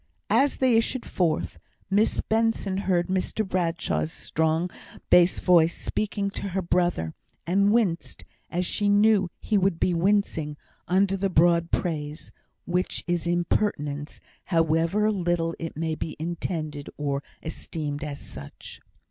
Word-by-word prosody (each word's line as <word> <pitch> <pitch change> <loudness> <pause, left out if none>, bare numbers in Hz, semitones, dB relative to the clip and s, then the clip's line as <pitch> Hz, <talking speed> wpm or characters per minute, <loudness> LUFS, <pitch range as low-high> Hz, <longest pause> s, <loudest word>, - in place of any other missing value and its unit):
As 280 +1 +3
they 255 -3 +4
issued 235 +2 0
forth, 155 - -1 0.3
Miss 205 +3 +2
Benson 220 -3 0
heard 185 -3 +1
Mr 190 +3 -1
Bradshaw's 165 - -1
strong 160 +2 -1 0.4
bass 180 0 +6
voice 170 -2 +4
speaking 205 -1 -2
to 200 - -5
her - - +2
brother, 175 - 0 0.3
and 200 +4 +3
winced, 205 -7 0 0.2
as 180 +1 -1
she 205 +3 +1
knew 205 -2 +4
he 210 -2 +1
would 190 -3 +1
be 180 - +2
wincing, 170 -5 +1 0.3
under 195 +2 +3
the 195 0 0
broad 170 -1 +3
praise, 155 -3 -3 0.3
which 180 +1 -1
is 175 -1 -1
impertinence, 170 -4 -1 0.3
however 165 +5 +2
little 175 -4 0
it 165 -2 -5
may 160 0 -1
be 155 0 -4
intended 155 -3 -4
or 140 -1 -1 0.2
esteemed 150 -2 -4
as 145 -2 -5
such. 70 -1 -10
175 Hz, 130 wpm, -26 LUFS, 160-195 Hz, 0.4 s, bass